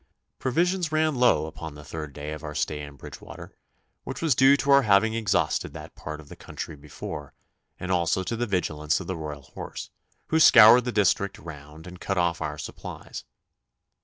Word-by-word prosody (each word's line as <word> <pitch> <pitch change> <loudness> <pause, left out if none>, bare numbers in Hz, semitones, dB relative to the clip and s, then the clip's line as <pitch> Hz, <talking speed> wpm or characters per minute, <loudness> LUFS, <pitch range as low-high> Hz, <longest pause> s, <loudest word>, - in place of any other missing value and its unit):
Provisions 170 +5 0
ran 155 0 +2
low 125 - +3
upon 80 -1 -8
the 75 - -11
third 75 0 -7
day 75 +2 -7
of 75 0 -7
our 75 -1 -6
stay 75 0 -2
in 70 -1 -9
Bridgewater, 70 - -11 0.5
which - - -6
was 160 -4 +2
due 135 +3 +6
to 140 - 0
our 140 0 +7
having 110 -1 +3
exhausted 110 -4 0
that - - -10
part 75 0 -7
of 75 - -13
the - - -11
country 75 - -7
before, 75 0 -8 0.4
and 90 - -4
also 90 +1 +1
to 115 - -3
the 120 +1 -2
vigilance 80 -6 0
of 95 - -7
the 95 - -3
Royal 75 -3 -6
Horse, - - -8 0.4
who 160 - +3
scoured 115 -3 +8
the 125 - -1
district 100 -2 +1
round 75 0 -11
and 90 0 -11
cut 95 - -2
off 85 -1 +1
our - - -3
supplies. - - -8
90 Hz, 190 wpm, -26 LUFS, 75-120 Hz, 0.5 s, scoured